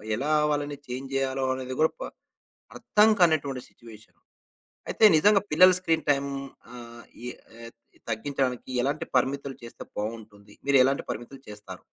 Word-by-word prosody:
ఎలా 140 Hz, +7 st, -2 dB, 0.2 s
వాళ్ళని 145 Hz, -1 st, -2 dB
చేంజ్ 130 Hz, +2 st, -6 dB
జేయాలో 135 Hz, 0 st, -1 dB
అనేది 130 Hz, 0 st, -5 dB
గూడ 160 Hz, -, +4 dB
ప -, -, -13 dB, 0.7 s
అర్థం 210 Hz, +1 st, +3 dB
కానటువంటి 145 Hz, -7 st, +2 dB
సిట్యుయేషన్. 110 Hz, -2 st, -16 dB, 0.7 s
అయితే -, -, +1 dB
నిజంగా 200 Hz, +5 st, +5 dB
పిల్లల 185 Hz, +5 st, +7 dB
స్క్రీన్ 165 Hz, -3 st, -1 dB
టైమ్ 140 Hz, 0 st, +1 dB, 0.4 s
ఆహ్, 120 Hz, -1 st, -11 dB, 0.2 s
ఇ -, -, -5 dB, 0.4 s
ఏ 115 Hz, -, -8 dB, 0.4 s
తగ్గించడానికి 130 Hz, +2 st, -2 dB
ఎలాంటి 140 Hz, +4 st, -1 dB
పరిమితులు 135 Hz, +2 st, -1 dB
చేస్తే 115 Hz, -, -10 dB, 0.2 s
బావుంటుంది. 105 Hz, -1 st, -7 dB
మీరు 140 Hz, -1 st, +5 dB
ఎలాంటి 135 Hz, +1 st, 0 dB
పరిమితులు 125 Hz, +4 st, -7 dB
చేస్తారు? 105 Hz, -3 st, -10 dB
135 Hz, 135 wpm, -26 LUFS, 115-145 Hz, 0.7 s, పిల్లల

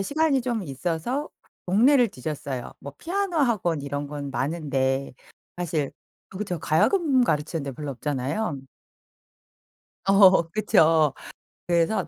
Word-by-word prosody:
시간이 285 Hz, +5 st, +1 dB
좀 235 Hz, -4 st, -2 dB
있어서 170 Hz, -, -3 dB, 0.4 s
동네를 240 Hz, +7 st, +4 dB
뒤졌어요. 135 Hz, -4 st, -5 dB
뭐 140 Hz, 0 st, -9 dB
피아노 375 Hz, -, -2 dB
학원 205 Hz, -, +1 dB
이런 145 Hz, +1 st, -4 dB
건 145 Hz, -1 st, -6 dB
많은데 135 Hz, -1 st, -1 dB, 0.5 s
사실 160 Hz, -5 st, -2 dB, 0.4 s
어 -, -, -6 dB
그쵸. 190 Hz, -4 st, -3 dB
가야금 260 Hz, -, +2 dB
가르치는 150 Hz, -3 st, -1 dB
데 140 Hz, -, -5 dB
별로 145 Hz, +2 st, -6 dB
없잖아요. 145 Hz, -, -2 dB, 1.5 s
어 195 Hz, -2 st, +7 dB
그쵸. 160 Hz, -7 st, +3 dB, 0.5 s
그래서 170 Hz, +5 st, +1 dB
165 Hz, 255 characters per minute, -25 LUFS, 145-225 Hz, 1.5 s, 어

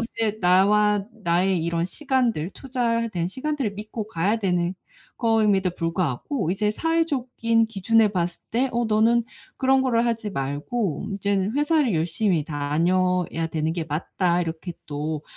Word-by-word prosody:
이제 225 Hz, -2 st, -2 dB
나와 200 Hz, +3 st, +4 dB
나의 180 Hz, -4 st, +1 dB
이런 170 Hz, 0 st, 0 dB
시간들 245 Hz, -, 0 dB
투자에 235 Hz, -3 st, -1 dB
대한 175 Hz, -2 st, -2 dB
시간들을 260 Hz, -1 st, -2 dB
믿고 215 Hz, +1 st, -6 dB
가야 200 Hz, +4 st, 0 dB
되는 180 Hz, -3 st, 0 dB, 0.4 s
거임에도 215 Hz, -5 st, +3 dB
불구하고 170 Hz, -, -2 dB
이제 210 Hz, +2 st, 0 dB
사회적인 250 Hz, -7 st, +1 dB
기준에 225 Hz, +1 st, +3 dB
봤을 175 Hz, -3 st, -2 dB
때 255 Hz, +4 st, +1 dB
어 240 Hz, 0 st, +1 dB
"너는 225 Hz, +2 st, +3 dB, 0.3 s
그런 265 Hz, 0 st, +3 dB
거를 240 Hz, -2 st, +2 dB
하지 225 Hz, -3 st, -1 dB
말고 145 Hz, -, -2 dB
이제는 200 Hz, +1 st, 0 dB
회사를 295 Hz, -, +2 dB
열심히 165 Hz, +1 st, +1 dB
다녀야 165 Hz, +4 st, 0 dB
되는 160 Hz, 0 st, -1 dB
게 165 Hz, -2 st, -2 dB
맞다." 175 Hz, +3 st, 0 dB
이렇게 165 Hz, +2 st, -5 dB
또 150 Hz, +1 st, -3 dB
200 Hz, 305 characters per minute, -24 LUFS, 170-230 Hz, 0.4 s, 나와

